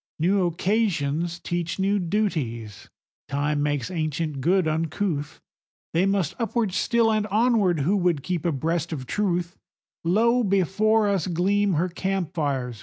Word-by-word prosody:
New 180 +3 +2
occasions 170 -4 0
teach 175 -1 -3
new 200 +1 +1
duties; 155 - -2 0.4
Time 145 +1 -1
makes 145 0 -1
ancient 155 -3 -2
good 180 +3 +2
uncouth; 155 -1 -2 0.5
They 175 +4 +3
must 195 -6 0
upward 230 -4 -1
still, 230 +2 +2
and 215 -1 0
onward, 210 - +2
who 180 +9 +2
would 175 -6 +1
keep 180 -4 -2
abreast 165 +1 -1
of 135 -5 -4
Truth; 175 +2 -1 0.5
Lo, 230 +8 +3
before 205 +3 +2
us 195 -5 0
gleam 195 +3 +1
her 170 +3 +1
camp 190 -1 -2
fires! 135 -8 -2
175 Hz, 135 wpm, -25 LUFS, 155-200 Hz, 0.5 s, They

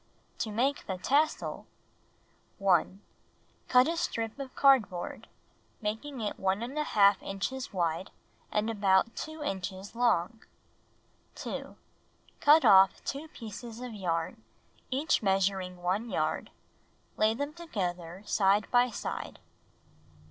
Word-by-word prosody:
To 225 - -1
Make 255 +7 0
the 190 -3 -3
Tassel 290 +11 0 0.9
1. 195 0 +2 0.7
Cut 250 +1 +5
a 335 - 0
strip 230 -8 -3
of 270 -2 -7
cardboard, 225 -11 +2 0.5
making 225 +5 -4
it 210 - -4
1§ 205 0 +2
inches 250 +7 -4
wide 175 0 -1 0.4
and 210 +1 0
about 200 +1 +2
2 315 -1 -6
inches 190 -4 -4
long. 230 -3 +1 0.9
2. - - -6 0.6
Cut 305 +2 +6
off 190 0 +6
2 285 +3 -4
pieces 230 -3 -9
of 250 -2 -6
yarn, 180 +2 -2 0.5
each 280 +4 +1
measuring 190 -2 0
1 200 +6 0
yard, - - -1 0.7
lay 215 +1 +3
them 285 +4 -3
together, 185 - -4
side 200 0 +3
by 245 0 +4
side. 225 - -5
215 Hz, 110 wpm, -30 LUFS, 190-260 Hz, 0.9 s, Cut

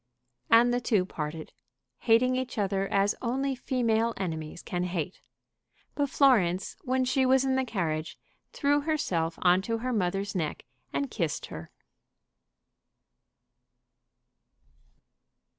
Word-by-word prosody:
And 235 +1 +6
the 245 - 0
two 210 -6 +2
parted, 155 -3 -6 0.5
hating 250 +2 +3
each 255 -1 -3
other 195 -1 0
as 200 +1 +2
only 265 +3 -1
female 235 -3 0
enemies 160 -3 -5
can 180 0 -2
hate. 180 0 -4 0.7
But 285 -1 0
Florence, 195 -11 +3
when 260 -4 0
she 255 +1 +2
was 260 +1 +4
in 265 - +1
the 265 0 +2
carriage, 165 -9 -3 0.3
threw 290 0 +1
herself 180 - -1
on 180 +1 +5
to 230 +3 -2
her 250 +2 -2
mother's 195 0 -1
neck 160 -6 -3 0.3
and 280 -4 -2
kissed 165 -7 -2
her. 80 +1 -8
225 Hz, 120 wpm, -28 LUFS, 180-255 Hz, 0.7 s, And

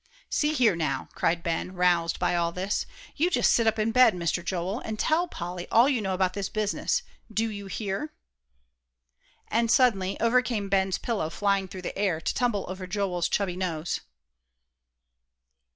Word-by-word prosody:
"See 300 0 +1
here, 235 - +3
now," 140 -5 -2
cried 170 0 0
Ben, 170 +2 -2
roused 175 -2 +2
by - - +1
all 170 -1 +1
this, 185 +3 -2 0.3
"you 330 +4 +2
just - - +3
sit 230 -1 +3
up 220 - +2
in 215 +1 +1
bed, 250 -3 +6
Mister 175 0 -1
Joel, 185 +5 -2
and 220 -3 -5
tell 325 +9 +2
Polly 175 - -6
all 235 +3 +6
you 265 -5 +1
know 190 -2 -1
about 185 0 +1
this 200 -1 -3
business. 215 - -1 0.3
Do 220 +2 0
you 200 -1 -7
hear?" 200 - -3 1.4
And 230 +1 +1
suddenly 220 -6 +3
over 235 +2 +4
came 215 -6 -3
Ben's 190 -1 +2
pillow 210 -10 -2
flying 200 +1 0
through 185 0 -9
the - - -4
air, 190 -5 0
to - - -2
tumble 235 -6 0
over 185 0 -6
Joel's 180 -3 -1
chubby 195 -3 0
nose. 175 -3 -2
195 Hz, 170 wpm, -27 LUFS, 180-225 Hz, 1.4 s, bed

